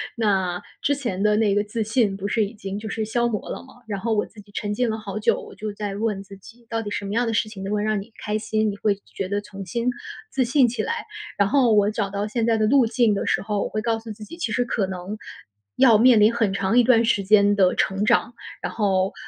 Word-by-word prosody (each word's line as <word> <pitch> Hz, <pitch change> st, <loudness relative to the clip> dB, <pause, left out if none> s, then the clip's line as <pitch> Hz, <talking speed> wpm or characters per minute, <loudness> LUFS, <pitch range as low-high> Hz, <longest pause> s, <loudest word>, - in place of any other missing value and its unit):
那 190 Hz, -5 st, 0 dB, 0.2 s
之 285 Hz, -, +2 dB
前 235 Hz, -9 st, -3 dB
的 210 Hz, 0 st, +3 dB
那 215 Hz, -2 st, +3 dB
个 205 Hz, -, +2 dB
自 215 Hz, +2 st, -3 dB
信 220 Hz, -2 st, +1 dB
不 200 Hz, +1 st, -3 dB
是 215 Hz, 0 st, +1 dB
已 200 Hz, -, -8 dB
经 195 Hz, -2 st, -6 dB
就 220 Hz, -, -7 dB
是 220 Hz, +2 st, -2 dB
消 235 Hz, +2 st, +1 dB
磨 215 Hz, -3 st, -3 dB
了 -, -, -5 dB
嘛， 265 Hz, -, -17 dB
然 200 Hz, -2 st, -3 dB
后 225 Hz, +3 st, -1 dB
我 210 Hz, -, +1 dB
自 220 Hz, -, -16 dB
己 205 Hz, 0 st, -20 dB
沉 205 Hz, 0 st, -2 dB
浸 245 Hz, +2 st, 0 dB
了 220 Hz, -, -2 dB
好 210 Hz, -1 st, -5 dB
久。 210 Hz, -, +2 dB
我 -, -, -11 dB
就 215 Hz, 0 st, -5 dB
在 205 Hz, -1 st, -4 dB
问 210 Hz, -2 st, -1 dB
自 195 Hz, 0 st, -12 dB
己 235 Hz, +5 st, -16 dB
到 225 Hz, -1 st, -1 dB
底 210 Hz, -, -5 dB
什 205 Hz, -, -3 dB
么 200 Hz, -, -4 dB
样 235 Hz, +2 st, +1 dB
的 225 Hz, -, -1 dB
事 215 Hz, -, +1 dB
情 195 Hz, -3 st, -8 dB
能 195 Hz, -, -4 dB
够 210 Hz, -, +1 dB
让 215 Hz, -1 st, 0 dB
你 225 Hz, +4 st, -13 dB
开 210 Hz, 0 st, -1 dB
心， 215 Hz, 0 st, 0 dB
你 200 Hz, -, -8 dB
会 205 Hz, -1 st, +1 dB, 0.2 s
觉 195 Hz, -, -3 dB
得 205 Hz, +1 st, -1 dB
重 195 Hz, -1 st, -9 dB
新 235 Hz, +7 st, -1 dB, 0.4 s
自 265 Hz, -, +1 dB
信 255 Hz, +1 st, +4 dB
起 240 Hz, +1 st, -2 dB
来。 460 Hz, 0 st, -3 dB, 0.3 s
然 200 Hz, -1 st, +3 dB
后 250 Hz, -4 st, +4 dB
我 205 Hz, -1 st, +4 dB
找 205 Hz, -2 st, -2 dB
到 200 Hz, +1 st, -2 dB
现 230 Hz, +1 st, -1 dB
在 225 Hz, -1 st, +2 dB
的 215 Hz, -, +2 dB
路 260 Hz, +2 st, +5 dB
径 230 Hz, -2 st, +2 dB
的 200 Hz, -, -2 dB
时 -, -, +1 dB
候， 205 Hz, -1 st, -1 dB
我 -, -, -3 dB
会 215 Hz, -, -2 dB
告 225 Hz, 0 st, 0 dB
诉 225 Hz, -1 st, -9 dB
自 215 Hz, 0 st, -9 dB
己 335 Hz, +10 st, -10 dB
其 245 Hz, -10 st, -2 dB
实 245 Hz, -, +2 dB
可 220 Hz, -4 st, 0 dB
能 190 Hz, +3 st, -6 dB, 0.6 s
要 235 Hz, -5 st, +6 dB
面 240 Hz, 0 st, +6 dB
临 220 Hz, +3 st, +5 dB
很 225 Hz, -4 st, +1 dB
长 195 Hz, +3 st, +1 dB
一 245 Hz, -, +6 dB
段 230 Hz, -1 st, +5 dB
时 205 Hz, -3 st, +2 dB
间 205 Hz, 0 st, +5 dB
的 185 Hz, -2 st, +4 dB
成 195 Hz, +1 st, 0 dB
长。 235 Hz, +1 st, +2 dB, 0.3 s
然 -, -, -3 dB
后， 195 Hz, -3 st, +1 dB
215 Hz, 295 characters per minute, -23 LUFS, 200-230 Hz, 0.6 s, 要